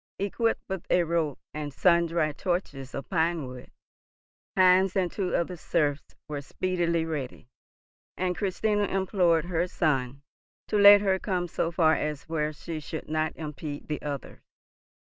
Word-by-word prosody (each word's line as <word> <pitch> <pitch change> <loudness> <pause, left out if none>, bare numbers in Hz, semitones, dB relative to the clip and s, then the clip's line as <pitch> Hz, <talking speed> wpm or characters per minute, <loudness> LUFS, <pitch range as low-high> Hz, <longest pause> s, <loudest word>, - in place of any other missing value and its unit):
Equipped 225 +4 0
with 190 -3 -4
a 180 - +4
rope 165 -4 -1 0.2
and 150 -1 -4
sundry 170 -1 +2
torches 145 -6 -3
of 140 - -5
pinewood, 160 -8 -1 0.9
Heinz 185 0 +5
and 185 -3 +1
two 190 -3 -2
of 170 - +1
the 180 - -7
serfs 150 -3 -1
were 150 -2 -4
speedily 170 +1 -1
ready, 140 -6 -5 0.7
and 180 -1 0
Christina 205 +2 0
implored 180 -4 +2
her 175 0 0
son 140 -6 -1 0.5
to 210 - +1
let 205 0 +9
her 190 -2 +1
come 180 -3 -1
so 165 0 -1
far 165 -2 +4
as 150 -2 -2
where 155 -2 -1
she 155 +1 -6
should 155 +1 -7
not 155 0 -1
impede 150 -1 -6
the 150 - -3
others. 145 -2 -6
165 Hz, 150 wpm, -27 LUFS, 150-185 Hz, 0.9 s, let